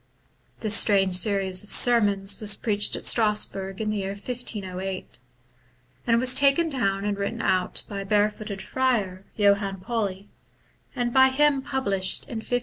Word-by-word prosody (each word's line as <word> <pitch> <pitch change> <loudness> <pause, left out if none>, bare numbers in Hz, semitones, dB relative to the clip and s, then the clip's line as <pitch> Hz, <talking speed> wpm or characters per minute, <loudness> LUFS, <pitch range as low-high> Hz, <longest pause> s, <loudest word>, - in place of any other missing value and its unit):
This 215 -2 +3
strange 195 -4 +4
series 190 0 +1
of 210 - -12
sermons 205 -5 +3
was 210 -1 +1
preached 205 -2 0
at - - -7
Strasbourg 210 -3 +1
in 215 -1 -2
the 215 - -3
year 195 0 -4
1508, 195 -4 -5 0.9
and 230 0 +3
was 255 +1 +2
taken 280 +5 +3
down 200 -8 -2
and 205 -1 -1
written 210 +4 -4
out 185 -1 0
by 200 - -6
a - - -8
barefooted 210 0 -1
friar, 205 -8 -2
Johann 200 -2 +1
Pauli, 200 -1 -4 0.7
and 240 -2 -2
by 265 0 +5
him 285 +1 +1
published 200 -9 -2
in 235 - -8
1517. 245 +3 -2
210 Hz, 150 wpm, -24 LUFS, 195-240 Hz, 0.9 s, by